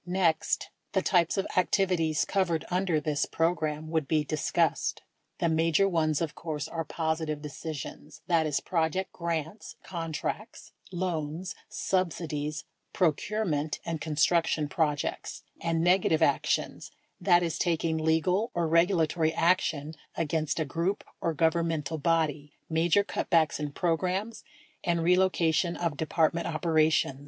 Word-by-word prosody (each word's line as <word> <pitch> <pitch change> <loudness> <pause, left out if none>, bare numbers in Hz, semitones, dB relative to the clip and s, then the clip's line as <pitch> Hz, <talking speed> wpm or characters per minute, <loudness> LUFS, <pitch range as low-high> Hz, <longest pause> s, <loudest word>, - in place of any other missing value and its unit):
Next, 180 -2 0 0.2
the 190 - +2
types 175 -1 +2
of 195 - +1
activities 180 -5 +2
covered 175 -5 0
under 180 -3 +1
this 150 -1 -1
program 155 -2 -1
wrnuld 160 -3 0
be 155 0 +2
discussed. 155 0 0 0.3
The - - +1
major 165 +3 +3
ones, 155 -4 +1
of 165 -1 -2
course, 150 -3 -4
are 165 -1 -3
positive 160 -1 -2
decisions 150 0 -7
(that 165 -3 +2
is, 150 - 0
project 175 +2 -1
grants, 170 +3 -4
contracts, 170 +5 -5 0.2
loans, 175 -1 -3 0.2
subsidies, 155 -5 -2 0.3
procurement 160 -2 0
and 165 -2 -3
construction 160 0 +2
projects), 150 -1 -2 0.2
and 165 -1 0
negative 175 -3 +3
ac 140 -3 +4
tions - - -1 0.3
(that 175 -2 +4
is, 165 -2 -2
taking 165 -1 0
legal 165 +7 +1
or 170 -1 +1
regulatory 165 -1 +3
action 165 -3 +1 0.2
against 160 -1 -1
a 160 - 0
group 170 +7 -1 0.2
or 165 -1 0
governmental 160 -1 0
body, 150 -2 0
major 170 +5 +3
cutbacks 165 -6 +1
in 150 -1 -3
programs, 185 +8 -1 0.4
and 170 -1 +1
relocation 175 -1 +2
of 170 -4 -1
Department 160 +2 +1
operations) 155 -3 +2
165 Hz, 125 wpm, -28 LUFS, 155-175 Hz, 0.4 s, ac